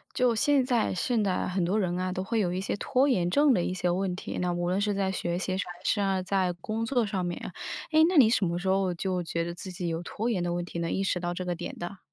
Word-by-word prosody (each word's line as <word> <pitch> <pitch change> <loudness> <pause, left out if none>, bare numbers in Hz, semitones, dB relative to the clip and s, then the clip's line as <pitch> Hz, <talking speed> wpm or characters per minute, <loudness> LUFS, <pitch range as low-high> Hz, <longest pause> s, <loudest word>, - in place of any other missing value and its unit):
就 250 -2 +3
现 275 +4 +3
在 245 -4 +1
现 220 +5 0
在 190 -3 0
很 180 0 0
多 190 +5 +1
人 180 -4 0
啊 185 0 -1
都 185 +1 -3
会 225 +2 0
有 180 -4 0
一 185 - -2
些 195 - -2
拖 265 +6 +2
延 180 -10 +2
症 285 +5 +5
的 180 - +2
一 180 - -1
些 180 -1 -1
问 180 +1 0
题， - - -5
那 180 0 0
无 175 0 -1
论 190 +2 +1
是 205 0 +1
在 195 -1 0
学 175 -2 -2
习 185 0 -2
上 190 - -3
还 175 - -17 0.4
是 185 - -1
在 185 -1 +1
工 215 +6 -3
作 240 -1 +1
上 195 -3 -2
面， 175 0 -4 0.4
诶， 315 0 +6
那 365 - 0
你 260 -7 +8
什 225 -3 +2
么 170 -1 -1
时 190 +2 -3
候 190 -1 +2
就 180 +1 -2
觉 170 0 -2
得 170 0 -5
自 185 +2 -7
己 180 -1 -4
有 165 0 -2
拖 215 +6 -3
延 205 -7 0
的 175 0 -1
问 175 0 -2
题 170 - -7
能 165 -1 -1
意 195 - 0
识 180 -2 0
到 175 0 -2
这 180 +1 -4
个 180 -1 -1
点 175 +1 -6
的？ 175 +3 -6
185 Hz, 310 characters per minute, -28 LUFS, 175-215 Hz, 0.4 s, 你